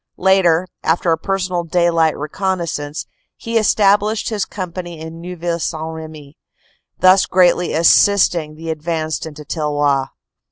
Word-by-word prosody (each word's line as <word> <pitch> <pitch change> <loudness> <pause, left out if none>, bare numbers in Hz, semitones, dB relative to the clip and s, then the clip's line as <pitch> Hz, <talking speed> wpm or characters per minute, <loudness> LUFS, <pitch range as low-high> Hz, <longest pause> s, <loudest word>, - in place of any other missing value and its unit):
Later, 185 -2 +3
after 165 +1 +1
a 165 - +2
personal 185 -2 -2
daylight 170 -1 +1
recon 190 +6 -2
naissance, 150 -3 -4 0.3
he 230 0 -6
established 210 0 +2
his 210 -4 -2
company 175 -3 -7
in 160 +1 -9
Neuville 175 -1 -4
St. 160 -1 -3
Remy, 155 -2 -10 0.6
thus 185 +1 +5
greatly 180 -1 +3
assisting 170 -2 +3
the 165 +1 -5
advance 160 0 -3
into 150 -1 -10
Tilloy. 145 -3 0
170 Hz, 125 wpm, -18 LUFS, 155-185 Hz, 0.6 s, thus